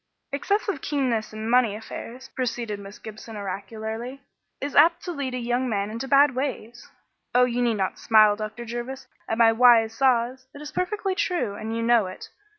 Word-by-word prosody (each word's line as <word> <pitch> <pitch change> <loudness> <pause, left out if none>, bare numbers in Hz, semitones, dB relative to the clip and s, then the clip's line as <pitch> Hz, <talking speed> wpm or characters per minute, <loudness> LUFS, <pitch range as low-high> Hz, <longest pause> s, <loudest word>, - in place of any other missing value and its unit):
"Excessive 400 +3 -1
keenness 250 -7 -1
in 215 +1 -6
money 235 -3 +3
affairs," 240 +3 -8
proceeded 235 -4 -3
Miss 200 0 -10
Gibson 220 +1 -10
oracularly, 220 +6 -6 0.4
"is 285 - -4
apt 335 +3 +5
to 355 - -4
lead 280 -5 -3
a - - -2
young 245 +1 -1
man 200 -1 -1
into 230 +4 -5
bad 280 0 +5
ways 245 -3 -5 0.5
oh, 250 0 +6
you 245 0 -1
need 235 -2 +2
not 190 -1 -2
smile, 215 -2 +5
Dr. 215 +3 -6
Jervis, 240 +3 -6 0.2
at 225 - -1
my 230 -1 +6
wise 225 -1 +5
saws; 260 0 +1
it - - -9
is 300 0 -8
perfectly 385 +3 -1
true, 360 - -1
and 220 +2 -5
you 230 - -1
know 230 -4 +4
it. 185 - -9
240 Hz, 180 wpm, -25 LUFS, 220-265 Hz, 0.5 s, oh